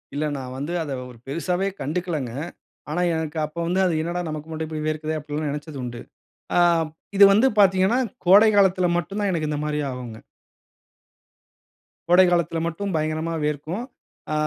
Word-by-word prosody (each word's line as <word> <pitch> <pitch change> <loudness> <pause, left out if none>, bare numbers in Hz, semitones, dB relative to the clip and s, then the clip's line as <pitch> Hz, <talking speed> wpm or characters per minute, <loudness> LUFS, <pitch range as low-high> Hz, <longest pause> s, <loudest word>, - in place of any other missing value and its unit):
இல்ல 155 - 0
நான் 130 -1 -6
வந்து 145 +5 -4
அத 145 - -6 0.2
ஒரு 120 - -15
பெரிசாவே 180 +6 -1
கண்டுக்கலங்க. 155 -5 -2 0.6
ஆனா 165 +4 -1
எனக்கு 160 -1 -3
அப்போ 155 +3 -8
வந்து 180 +2 +1
அது 175 - +1
"என்னடா 175 +2 -2
நமக்கு 155 +1 -6
மட்டும் 160 0 -4
இப்படி 155 -1 -4
வேர்க்கிறதே" 155 0 -2
அப்படின்னு 150 +1 -4
நெனைச்சது 150 0 -6
உண்டு. 120 -1 -6 0.6
ஆ - - +5 0.6
இது 200 - +9
வந்து 220 +7 +5
பார்த்தீங்கன்னா, 190 +3 +4 0.3
கோடை 200 +5 +7
காலத்தில 190 -2 +4
மட்டும் 195 +5 -3
தான் 205 -2 +1
எனக்கு 155 -3 -1
இந்த 150 - -2
மாதிரி 150 0 -1
ஆகும்ங்க. 120 -3 -7 1.9
கோடை 180 +2 +7
காலத்தில 170 -2 +1
மட்டும் 190 +3 -3
பயங்கரமா 155 +1 -1
வியர்க்கும். 150 - -2 0.5
ஆ - - 0
160 Hz, 160 wpm, -23 LUFS, 150-180 Hz, 1.9 s, இது